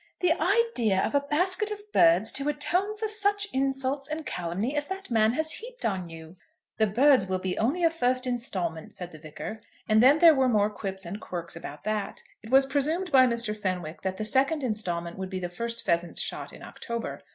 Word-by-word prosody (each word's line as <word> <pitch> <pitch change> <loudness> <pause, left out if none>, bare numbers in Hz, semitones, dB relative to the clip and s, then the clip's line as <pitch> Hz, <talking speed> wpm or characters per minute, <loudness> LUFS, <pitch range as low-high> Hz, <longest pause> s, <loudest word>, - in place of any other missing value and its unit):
"The 355 -3 +4
idea 355 - +2
of - - -4
a 285 - +4
basket 360 +9 +1
of 420 0 -8
birds 175 +6 +5
to 275 +2 0
atone 360 +8 0
for 440 +1 -2
such 410 -1 +1
insults 270 +1 -1
and 305 0 -5
calumny 180 - -3
as 290 0 -1
that 385 -5 -7
man 220 0 +3
has 315 +3 0
heaped - - -6
on 185 -4 -2
you!" 165 +2 -11 0.4
"The 220 - +4
birds 250 0 +4
will 185 0 -1
be 185 0 -3
only 290 +11 0
a 330 - +4
first 255 -5 0
instalment," 190 -10 -3
said 180 -1 -7
the 155 - -12
Vicar, 155 +8 -8 0.3
and 215 0 +4
then 270 +5 +6
there 330 0 +8
were 265 -3 +2
more 210 -2 +2
quips 195 -2 -5
and 195 +5 -6
quirks 170 -2 -6
about 160 -3 -9
that. 210 -1 -3 0.2
It 220 - -12
was 270 +2 +5
presumed 305 +7 -1
by 260 -2 +6
Mr. 235 -3 -1
Fenwick 180 -6 -4
that 190 0 -3
the 215 - -3
second 275 +6 +2
instalment 175 -7 -3
would 190 0 -4
be 185 -1 -4
the 175 -1 -4
first 230 +6 -3
pheasants 170 -2 0
shot - - -3
in - - -13
October. 235 -1 -6
235 Hz, 210 wpm, -27 LUFS, 190-295 Hz, 0.4 s, there